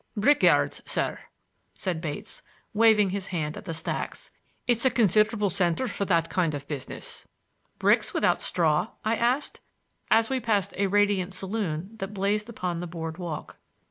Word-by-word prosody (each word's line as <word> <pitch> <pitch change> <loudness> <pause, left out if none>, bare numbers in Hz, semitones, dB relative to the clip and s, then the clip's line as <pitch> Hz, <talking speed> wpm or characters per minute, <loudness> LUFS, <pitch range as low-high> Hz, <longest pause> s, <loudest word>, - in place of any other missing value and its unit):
"Brick 285 +8 +4
yards, - - +3
sir," - - -1 0.6
said 175 -4 -3
Bates, 150 -4 -6 0.3
waving 210 -3 +5
his 195 0 -3
hand 155 -4 -2
at - - -9
the 165 - -4
stacks. 160 - -5 0.3
"It's 240 -2 +2
a 260 - +5
considerable 215 -2 +3
center 180 +6 +1
for 200 - -2
that 170 -3 +2
kind 165 -5 0
of 140 0 -7
business." 145 -4 -6 0.5
"Bricks - - +3
without - - +2
straw?" 165 +5 +1
I 220 +1 +2
asked, 245 +5 0 0.5
as 225 0 +4
we 265 +1 0
passed 210 -5 0
a 200 0 +1
radiant 200 -2 +2
saloon 190 -3 -3
that 195 0 -5
blazed 205 +3 0
upon 180 -6 -3
the 175 - -4
board 165 0 -6
walk. 170 -4 -6
195 Hz, 160 wpm, -27 LUFS, 170-215 Hz, 0.6 s, waving